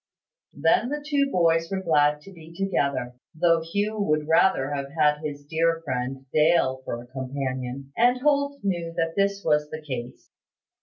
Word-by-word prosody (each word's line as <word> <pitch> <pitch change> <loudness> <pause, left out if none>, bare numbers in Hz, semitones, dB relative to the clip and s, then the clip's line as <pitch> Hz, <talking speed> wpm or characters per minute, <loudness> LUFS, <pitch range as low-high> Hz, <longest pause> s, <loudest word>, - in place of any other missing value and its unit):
Then 165 - +2
the 295 0 -4
two 280 -2 +2
boys 165 -2 +2
were 190 -1 -3
glad 150 -3 +3
to 195 +5 -13
be 165 -2 -13
together, 140 -10 -1 0.3
though 165 -1 +4
Hugh 205 +6 -2
would 155 -6 0
rather 160 -4 +3
have 140 -1 -3
had 150 -1 +3
his 145 -2 -6
dear 165 +2 +1
friend 130 0 -3
Dale 150 -4 +3
for 120 0 -4
a - - -15
companion; 130 0 -5
and 245 +2 +3
Holt 280 0 +1
knew 170 -4 -2
that 165 0 0
this 200 0 0
was 150 -1 +2
the 155 - -6
case. 125 -4 -7
160 Hz, 165 wpm, -25 LUFS, 140-190 Hz, 0.3 s, though